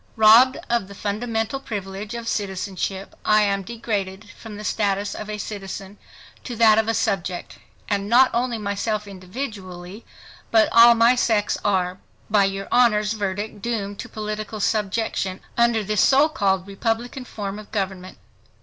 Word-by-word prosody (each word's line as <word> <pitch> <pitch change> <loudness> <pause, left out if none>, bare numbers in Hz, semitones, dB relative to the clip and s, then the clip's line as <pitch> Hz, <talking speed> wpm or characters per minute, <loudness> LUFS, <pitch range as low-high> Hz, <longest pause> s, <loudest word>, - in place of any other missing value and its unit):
Robbed 230 +4 +7
of 235 -5 0
the 200 - -11
fundamental 225 +4 -2
privilege 205 -2 -6
of 235 -1 -6
citizenship, 195 -1 -3
I 215 0 +4
am 200 -1 +1
degraded 205 -2 -4
from 220 -3 -10
the 210 - -8
status 205 -1 -1
of 215 - -7
a 210 - -4
citizen 195 -1 -7 0.4
to 245 - -6
that 220 -1 +5
of 220 - 0
a 225 - +1
subject; 190 -5 -2 0.3
and 200 -1 -1
not 255 +3 +6
only 240 0 0
myself 210 0 -2
individually, 190 -1 -7 0.5
but 220 -1 +4
all 235 0 +8
my 230 +2 +5
sex 220 -4 +1
are, 185 -2 0 0.3
by 205 -2 +5
your 195 0 -3
Honor's 215 -3 +3
verdict 205 0 -4
doomed 205 -3 -3
to - - -7
political 215 0 -5
subjection 205 -2 -1 0.2
under 235 -2 +3
this 210 0 +1
so 280 +3 +5
called 195 -10 0
republican 225 +6 -3
form 205 -4 -6
of 210 - -13
government. 190 -3 -4
210 Hz, 150 wpm, -23 LUFS, 195-225 Hz, 0.5 s, all